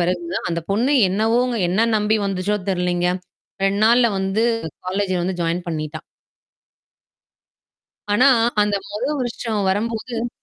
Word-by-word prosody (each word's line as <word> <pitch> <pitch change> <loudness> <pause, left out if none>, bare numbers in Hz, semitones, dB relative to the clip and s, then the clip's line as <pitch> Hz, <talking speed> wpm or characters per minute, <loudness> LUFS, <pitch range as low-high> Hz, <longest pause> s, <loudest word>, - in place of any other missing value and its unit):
பிறகு 180 +1 0 0.2
தான் - - -3
அந்தப் 170 -1 -4
பொண்ணு 245 +8 +1 0.2
என்னவோங்க 230 +5 +1
என்ன 220 +5 +2
நம்பி 210 +1 +2
வந்துச்சோ 195 +2 -1
தெரியலேங்க. 180 -1 0 0.5
2 195 +1 +1
நாள்ல 235 +1 +5
வந்து 195 +4 0 0.4
காலேஜ் 190 +1 -1
வந்து 180 0 -2
ஜாயின் 170 +2 -1
பண்ணிட்டா! 155 -1 -4 2.1
ஆனா, 255 +6 +5 0.3
அந்த 205 -1 +1
முதல் 255 +9 -2
வருஷம் 230 -3 -2
வரும்போது.ம். 230 +3 -2
205 Hz, 120 wpm, -21 LUFS, 180-230 Hz, 2.1 s, நாள்ல